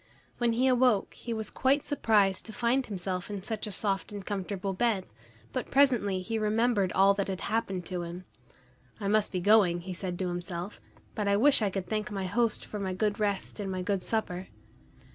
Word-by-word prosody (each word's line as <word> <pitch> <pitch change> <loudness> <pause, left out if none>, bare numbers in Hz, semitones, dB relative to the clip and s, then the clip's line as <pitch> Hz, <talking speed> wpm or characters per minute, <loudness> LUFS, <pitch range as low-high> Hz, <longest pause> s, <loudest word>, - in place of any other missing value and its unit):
When 240 -1 +2
he 245 +3 +2
awoke 250 -5 +3
he 240 - -7
was 220 -1 -3
quite 275 +2 +2
surprised 210 -9 +2
to 220 - -8
find 250 +3 +1
himself 185 -2 -3
in 200 -2 -5
such 220 0 -3
a - - -5
soft 195 0 -1
and 200 -2 -7
comfortable 195 -1 -3
bed, 210 -2 +1 0.5
but 255 - -3
presently 240 -9 +3
he 225 +4 -2
remembered 215 -2 +2
all 195 +1 +5
that 200 -1 -2
had 190 -1 -4
happened 195 -5 -1
to 180 -1 -3
him. 175 +2 -7 0.7
"I 200 - -3
must 215 +1 +2
be 185 - -1
going," 190 -3 +4
he 185 +1 -6
said 180 0 -4
to 185 - -1
himself, 175 +2 -5 0.3
"but 210 -2 -2
I 200 0 +3
wish 275 +3 +5
I 205 - +2
could 190 -1 -3
thank 215 +3 -2
my 195 -2 -3
host 225 +4 0
for 210 - -6
my 190 -2 -2
good 210 +1 0
rest 205 0 -2
and 195 -2 -3
my 185 -1 -3
good 195 0 0
supper." 190 -5 -2
200 Hz, 200 wpm, -29 LUFS, 185-225 Hz, 0.7 s, all